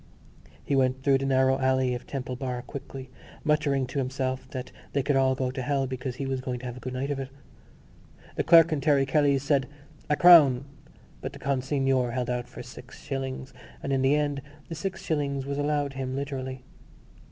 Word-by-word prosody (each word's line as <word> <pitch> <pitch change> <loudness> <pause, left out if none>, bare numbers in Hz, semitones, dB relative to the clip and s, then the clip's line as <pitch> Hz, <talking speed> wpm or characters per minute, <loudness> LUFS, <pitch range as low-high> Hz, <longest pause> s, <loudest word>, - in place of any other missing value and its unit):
He 140 - +1
went 130 0 +1
through 135 -1 +4
the 135 - -2
narrow 130 0 +3
alley 130 -1 +2
of 125 - -6
Temple 130 -2 -4
Bar 125 -1 -4
quickly, 135 -2 -8 0.3
muttering 150 -3 +2
to 130 +3 -4
himself 130 0 -2
that 130 -1 -6 0.2
they 140 - +1
could 145 - +1
all 130 -1 +3
go 130 -1 -1
to 130 0 -4
hell 140 0 0
because 130 -1 -4
he 135 - -4
was 135 -1 -2
going 125 -1 -3
to - - -8
have 125 -1 -5
a - - -9
good 125 +1 -6
night 135 +3 -2
of 140 - -2
it. 135 -1 -5 1.1
The - - 0
clerk 165 0 +7
in 145 - -1
Terry 140 -3 +3
Kelly's 140 -1 +2
said 140 -2 +2 0.4
A 150 - +4
crown! 145 -7 +7 0.6
but - - -5
the - - -10
consignor 135 -2 0
held 125 -1 -1
out 125 0 -3
for - - -9
six 125 +1 -12
shillings; 135 -1 -4 0.3
and 140 - -1
in 135 - +2
the 135 +2 +4
end 145 -2 0 0.3
the - - -4
six 190 +4 -4
shillings 140 -3 -1
was 140 +1 -3
allowed 145 -1 0
him 130 -1 -4
literally. 130 -2 -4
135 Hz, 200 wpm, -27 LUFS, 130-140 Hz, 1.1 s, clerk